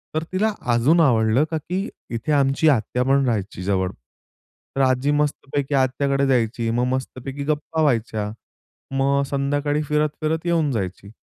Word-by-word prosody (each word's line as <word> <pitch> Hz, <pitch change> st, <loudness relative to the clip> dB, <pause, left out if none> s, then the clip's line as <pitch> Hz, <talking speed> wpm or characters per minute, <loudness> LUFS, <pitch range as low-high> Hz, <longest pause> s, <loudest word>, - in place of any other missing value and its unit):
तर 155 Hz, -, 0 dB
तिला 210 Hz, +4 st, +1 dB, 0.2 s
अजून 135 Hz, +9 st, +4 dB
आवडलं, 115 Hz, -2 st, +3 dB
का 160 Hz, -, 0 dB
की 180 Hz, +6 st, -3 dB, 0.3 s
इथे 115 Hz, +6 st, -3 dB
आमची 140 Hz, +1 st, +3 dB
आत्या 125 Hz, -1 st, +1 dB
पण 135 Hz, +1 st, +3 dB
राहायची 105 Hz, -6 st, -2 dB
जवळ. 95 Hz, -1 st, 0 dB, 0.9 s
तर 135 Hz, -, +1 dB
आजी 130 Hz, +2 st, +2 dB
मस्तपैकी 145 Hz, -1 st, -1 dB
आत्याकडे 135 Hz, +1 st, +1 dB
जायची 115 Hz, -2 st, +1 dB
मग 120 Hz, +2 st, +1 dB
मस्तपैकी 130 Hz, +1 st, -5 dB
गप्पा 155 Hz, +2 st, -1 dB
व्हायच्या. 115 Hz, -7 st, 0 dB, 0.6 s
मग 135 Hz, +1 st, +2 dB
संध्याकाळी 145 Hz, +1 st, 0 dB
फिरत-फिरत 155 Hz, +2 st, -1 dB
येऊन 165 Hz, -4 st, +1 dB
जायची. 100 Hz, -3 st, -4 dB
135 Hz, 140 wpm, -22 LUFS, 120-150 Hz, 0.9 s, अजून